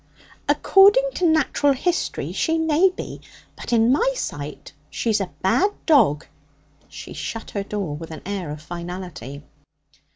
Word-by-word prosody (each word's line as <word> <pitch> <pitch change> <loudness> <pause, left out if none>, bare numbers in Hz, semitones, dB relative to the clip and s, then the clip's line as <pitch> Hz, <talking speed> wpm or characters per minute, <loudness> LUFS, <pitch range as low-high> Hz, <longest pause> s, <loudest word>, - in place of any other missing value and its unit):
'According 410 +6 +5
to 360 - +1
natural 295 -2 +2
history 350 +6 -2
she 325 0 0
may 320 +3 +3
be, 365 - -8 0.3
but - - -8
in 230 0 +4
my 485 - +2
sight 145 - -6 0.2
she's 215 -3 0
a 190 - -3
bad 350 - +3 0.2
dog.' 220 - +4 0.6
She - - -9
shut 225 - -6
her 200 - -2
door 195 -6 -4
with 165 +2 -8
an 160 -2 -9
air 190 -4 -4
of 150 +1 -7
finality. 170 -5 -7
215 Hz, 140 wpm, -22 LUFS, -, 0.6 s, According